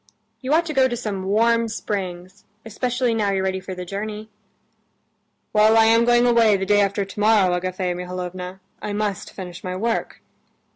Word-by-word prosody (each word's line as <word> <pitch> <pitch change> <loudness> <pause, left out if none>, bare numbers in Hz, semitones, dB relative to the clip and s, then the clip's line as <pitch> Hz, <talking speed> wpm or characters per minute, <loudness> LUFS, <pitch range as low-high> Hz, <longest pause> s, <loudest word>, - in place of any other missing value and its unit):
You 260 - -4
ought 335 +1 +2
to 315 - -4
go 265 -2 +4
to 240 -1 -3
some 205 -5 -4
warm 230 +3 +2
springs, 190 -3 -5 0.2
especially 245 +2 -1
now 215 -3 0
you're 195 -1 0
ready 190 0 -1
for 185 0 -7
the 180 0 -6
journey." 210 +3 -6 1.2
"Well, 215 +1 +5
I 225 - +6
am 230 +1 +4
going 240 0 +4
away 230 -4 +4
the 190 - -3
day 205 +1 +4
after 200 0 0
tomorrow, 205 -2 +2
Agafea 185 0 -2
Mihalovna; 180 +1 -6 0.2
I 210 - -4
must 205 -2 -3
finish 180 -2 -8
my 185 0 -4
work." 225 +4 -3
205 Hz, 175 wpm, -22 LUFS, 185-225 Hz, 1.2 s, I